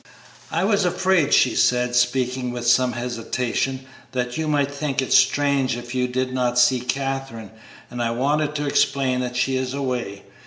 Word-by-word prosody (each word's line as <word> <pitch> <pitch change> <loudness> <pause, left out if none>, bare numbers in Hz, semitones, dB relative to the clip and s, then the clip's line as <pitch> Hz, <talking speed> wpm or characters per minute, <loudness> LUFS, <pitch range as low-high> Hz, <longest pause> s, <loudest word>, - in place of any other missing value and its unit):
"I 165 +3 -1
was 200 0 +2
afraid," 180 -3 +1
she 125 - +4
said, 125 0 +2
speaking 125 0 0
with 120 -1 -5
some 125 +1 +3
hesitation, 125 +2 -3 0.3
"that 125 -1 -2
you 160 0 -2
might 145 -2 +1
think 145 -1 -2
it 130 - 0
strange 140 -4 +3
if 120 0 -8
you 125 -1 0
did 130 +1 -2
not 125 -1 0
see 125 +1 +4
Katherine, 135 -4 -4 0.4
and 120 - -4
I 115 - 0
wanted 145 +5 0
to 150 0 -2
explain 140 -2 +1
that 125 -1 -4
she 130 +1 +1
is 130 0 -3
away. 125 -8 -4
130 Hz, 170 wpm, -22 LUFS, 125-140 Hz, 0.4 s, she